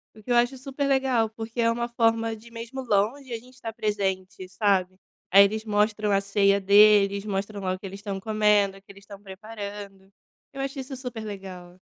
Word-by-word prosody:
O 215 - -15
que 245 - -5
eu - - +4
acho 245 +2 +2
super 275 +2 -4
legal, 265 -5 +2
porque 225 +2 -5
é 230 - +3
uma 235 +1 -1
forma 225 -1 +1
de, 225 +2 -15
mesmo 230 +3 -7
longe, 245 +4 0
a - - -2
gente 250 +3 -17
estar 230 -3 -7
presente, 195 -3 -3
sabe. 190 -1 +1 0.3
Aí 200 +2 +9
eles 215 +2 -1
mostram 210 0 +1
a 195 0 +3
ceia 200 0 +2
deles, 200 0 +5
mostram 200 0 -3
lá 185 -1 -1
o 185 - -6
que 195 - -11
eles 195 +1 -7
estão 200 -2 -5
comendo, 210 -2 +2
o - - -17
que 200 - -15
eles 200 0 -16
estão 200 -1 -12
preparando. 200 -1 -9 0.4
Eu 270 - -5
acho 275 +1 -4
isso 265 +1 -6
super 250 -4 -7
legal. 185 -3 -9
210 Hz, 205 wpm, -25 LUFS, 195-230 Hz, 0.4 s, Aí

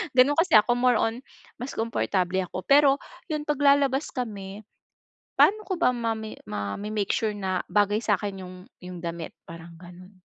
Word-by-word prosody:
Ganun 265 +3 +5
kasi 330 - +3
ako, 215 +3 +5
more 245 -1 +3
on 225 +1 0 0.4
mas 250 +3 -5
komportable 190 -5 -1
ako 180 0 -6
pero 280 +1 +5 0.3
yung 300 -1 -2
pag 295 -1 -1
lalabas 280 0 +3
kami 210 -4 -6 0.8
pa'no 430 +1 +4
ko 375 - -1
ba - - +4
mami 225 -3 -3
mame-make 195 - -4
sure 220 -2 0
na 190 -2 -2
bagay 205 0 +2
sa'kin 200 -2 -1
yung 185 0 -10 0.3
yung 180 -1 -8
damit 170 -1 -5 0.2
parang 165 0 -10
ganun? 185 +2 -14
210 Hz, 155 wpm, -26 LUFS, 185-255 Hz, 0.8 s, Ganun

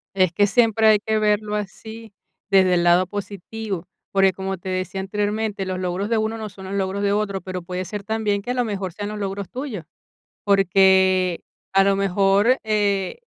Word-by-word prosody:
Es 185 -3 +2
que 205 - +3
siempre 225 0 +3
hay 215 -1 +6
que 220 +1 -1
verlo 210 0 +1
así 220 +2 -7 0.4
desde 190 -2 +4
el 175 -1 +2
lado 175 +1 +4
positivo, 200 -1 -6 0.3
porque 195 -1 +3
como 190 +1 -4
te 185 - -11
decía 185 +1 -3
anteriormente, 205 +1 -2
los 185 0 -3
logros 185 +3 -2
de 230 - +2
uno 220 +1 -1
no 215 -1 -6
son 190 -1 -12
los 190 - -6
logros 195 0 -1
de 200 0 +1
otro, 205 -2 -1
pero 185 -1 -6
puede 180 +1 -5
ser 205 +1 -6
también 210 -2 -1
que 245 +5 -4
a - - 0
lo 245 -1 0
mejor 195 -3 -3
sean 205 +4 -6
los 210 0 -6
logros 195 -1 -4
tuyos, 245 - -6 0.6
porque 190 -2 +3 0.3
a 195 - +5
lo 195 0 +2
mejor, 200 +5 +3
eh, 205 -3 0
200 Hz, 195 wpm, -22 LUFS, 190-215 Hz, 0.6 s, hay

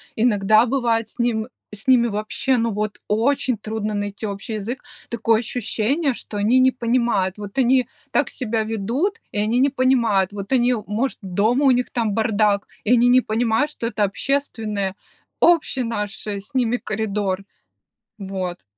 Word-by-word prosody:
иногда 215 -1 +4
бывает 230 -3 0
с - - -12
ним 230 -2 0 0.3
с 210 +3 -8
ними 250 -2 +5
вообще, 215 +4 0
ну, 230 0 0
вот 210 +1 -3
очень 240 +3 +1
трудно 215 0 -4
найти 205 +1 -4
общий 200 +2 -5
язык. 225 +5 -5 0.2
Такое 230 -1 +1
ощущение, 245 +5 -1
что 225 - -9
они 215 +5 +3
не 260 0 +5
понимают, 235 -6 0
вот 205 +1 -8
они 255 0 +3 0.2
так - - +2
себя 225 -3 -2
ведут, 235 - -2
и - - -6
они 220 +4 +1
не 275 +2 +4
понимают. 235 -8 +2
Вот 200 +1 -7
они, 250 -1 +3
может, 230 +6 -1
дома 210 +8 +1
у 270 - +6
них 250 0 +1
там 225 -4 -1
бардак, 210 -2 +1 0.2
и 215 - 0
они 245 0 +5
не 250 +1 +6
понимают, 230 +6 0
что 230 - -4
это 225 -2 -1
общественное 210 -3 -1 0.4
общий 325 -6 +3
наш 210 -3 -4
с 205 +4 -5
ними 245 -2 +1
коридор. 205 -4 -2 0.7
Вот. 190 -3 -5
225 Hz, 160 wpm, -22 LUFS, 205-250 Hz, 0.7 s, у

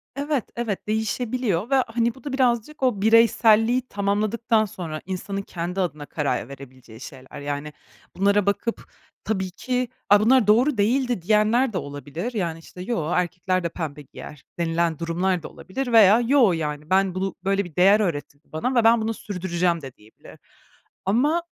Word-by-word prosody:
Evet, 285 -3 -1
evet, 225 -4 -4
değişebiliyor 220 -1 -1
ve, 275 - +3
hani, 230 +1 0
bu 265 - -17
da 280 -2 -5
birazcık 260 +2 0
o 225 -6 +1
bireyselliği 230 +2 +4
tamamladıktan 215 +3 0
sonra 165 -6 -6
insanın 195 +1 -4
kendi 180 0 -5
adına 155 -5 -3
karar 140 -5 -2
verebileceği 130 -4 -12
şeyler. 135 0 -10
Yani 145 +1 -5 0.4
bunlara 200 +1 +2
bakıp, 200 +3 -1 0.4
tabii 190 -4 -2
ki, 250 +5 -2 0.2
“A 205 0 +7
bunlar 245 0 +4
doğru 240 +5 +4
değildi.” 245 0 +1
diyenler 215 +5 +2
de - - -1
olabilir, 145 - -6
yani 170 -6 -2
işte 180 +2 -12
“Yoo, 175 -6 -2
erkekler 180 +1 -1
de 170 - -1
pembe 150 -3 -6
giyer.” 145 0 -12 0.2
denilen 165 -1 0
durumlar 170 +1 -1
da - - -6
olabilir 245 +6 -5
veya 220 0 +7
“Yoo, 245 -4 +4
yani 150 -1 -4
ben 190 -1 +2
bunu 190 0 -2
böyle 195 0 0
bir 165 - -13
değer 195 +4 +5
öğretildi 145 -6 -4
bana 250 +12 -2
ve 235 - +4
ben 230 0 +5
bunu 225 +1 -1
sürdüreceğim.” 175 -4 -2
de 135 -2 -9
diyebilir. 110 +1 -17 0.7
Ama 290 - +2
195 Hz, 160 wpm, -23 LUFS, 165-230 Hz, 0.7 s, A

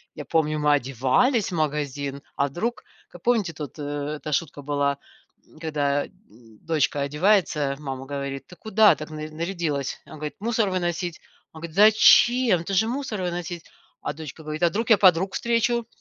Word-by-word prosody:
Я 150 - -7
помню 155 -1 +1
мы 150 0 +3
одевались 140 - +1
в - - -3
магазин, 145 -2 -2
а 140 - +2
вдруг? 220 - -3 0.3
Как 175 - -14
помните 220 -8 +1
тут, 150 -1 -8
э, 145 +1 -3
эта 150 +1 -7
шутка 145 -1 -2
была, 140 0 0 0.5
м, 155 - -19
когда 145 -3 0 0.6
дочка 150 -3 +1
одевается, 150 -2 +2
мама 135 -2 -6
говорит: 140 -1 -5
"Ты 180 - -13
куда 220 +2 +4
так 155 +1 -8
нар 155 0 -6
нарядилась?" 160 -4 -3
Она - - -11
говорит: 150 0 -6
"Мусор 220 -1 0
выносить." 175 -2 -2 0.3
Она 160 - -11
говорит: 165 -1 -8
"Зачем? 220 -1 +6
Ты 195 - -4
же 220 +4 +3
мусор 250 -5 -3
выносить". 175 -1 -4 0.4
А - - -3
дочка 155 +1 -9
говорит: 155 +2 -4
"А - - +6
вдруг 220 +7 -3
я 220 - +8
подруг 185 0 +4
встречу". 235 0 0
160 Hz, 170 wpm, -24 LUFS, 145-195 Hz, 0.6 s, я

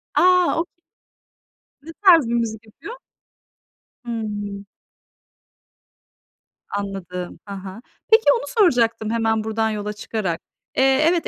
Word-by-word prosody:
A, 360 -2 +4
okay. 335 - -3 1.1
Ne 325 +2 -10
tarz 335 - +7
bir 235 - -1
müzik 225 -2 -2
yapıyor? 420 - -10 1.1
Hımm. 205 -3 -4 2.0
Anladım. 190 -3 -5
He 200 - -6
he, 195 +3 -8 0.3
peki, 445 +1 +7
onu 480 - -2
soracaktım 240 - +2
hemen 225 -1 +1
buradan 220 0 0
yola 210 0 -3
çıkarak. 200 -5 -3 0.4
Eee, 270 +3 +4
evet, 345 -1 0
225 Hz, 105 wpm, -22 LUFS, 205-315 Hz, 2.0 s, tarz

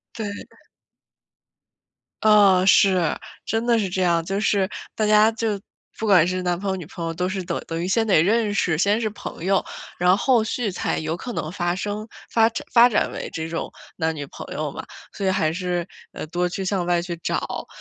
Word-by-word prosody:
对 220 - -4 0.2
的。 - - -25 1.6
啊， 205 -4 +6
是， 185 -4 +4 0.3
真 225 +1 -1
的 235 -1 +4
是 200 - -1
这 185 +1 -1
样， 170 -2 +2
就 195 +3 -2
是 195 -2 +2 0.3
大 215 - 0
家 215 +1 +5
就 220 -3 -2 0.4
不 220 - -2
管 190 -6 +6
是 185 +1 -1
男 175 -1 +1
朋 195 0 -2
友 190 - -1
女 175 -5 -7
朋 170 -1 -7
友 165 - -2
都 180 +2 -2
是 190 0 -3
等 170 -1 -3
等 165 0 -3
于 180 - -2
先 225 +3 +2
得 190 -7 +5
认 210 +2 +1
识， 175 -6 +1
先 205 +5 +2
是 220 -2 -1
朋 205 - -8
友， 195 0 +2 0.3
然 180 +1 +4
后 245 +1 +3
续 220 -1 -2
才 180 - -2
有 160 +1 -2
可 245 +7 -6
能 155 - -3
发 175 -1 -1
生， 210 +3 -4 0.2
发 225 -1 +4 0.2
发 240 0 +7
展 220 - +1
为 - - -6
这 160 0 -4
种 165 - -3 0.3
男 160 -1 0
女 145 -2 -5
朋 - - -9
友 - - -2
嘛。 - - -8 0.3
所 195 - -3
以 - - +3
还 160 -4 +1
是， 180 -1 -2 0.3
呃， - - -6
多 180 +2 0
去 190 +2 -4
向 185 -2 -1
外 175 -1 +2
去 175 -1 -5
找。 - - -2
190 Hz, 225 characters per minute, -23 LUFS, 175-210 Hz, 1.6 s, 发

